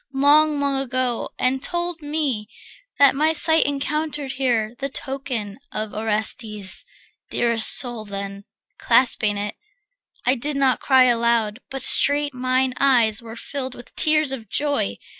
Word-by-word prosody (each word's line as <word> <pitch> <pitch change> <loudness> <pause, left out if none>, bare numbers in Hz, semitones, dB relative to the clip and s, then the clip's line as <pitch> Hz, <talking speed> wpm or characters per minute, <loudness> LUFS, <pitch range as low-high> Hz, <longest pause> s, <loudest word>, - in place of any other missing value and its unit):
long, 295 +2 +3
long 280 -1 0
ago, 255 -2 -3
And 260 +1 -1
told 345 +1 -3
me 290 -8 -3 0.5
that 280 -2 +5
my 310 +3 +1
sight 320 -1 +5
encountered 290 0 -3
here 240 -5 -1
The 275 0 -4
token 255 -6 -5
of 215 -1 -6
Orestes, 210 -3 0 0.5
dearest 235 -2 +5
soul 240 -4 +3
Then, 200 0 -7 0.4
clasping 215 -5 +2
it, 205 0 -5 0.7
I 255 - +3
did 285 +3 -4
not 270 -2 +1
cry 265 -2 +3
aloud, 235 -2 0
But 270 0 -5
straight 290 0 +3
mine 255 0 -1
eyes 240 -6 +2
were 225 -1 -11
filled 260 +1 -6
with 245 - -14
tears 305 -2 +1
of 230 -6 -7
joy. 285 - -2
255 Hz, 140 wpm, -21 LUFS, 225-285 Hz, 0.7 s, that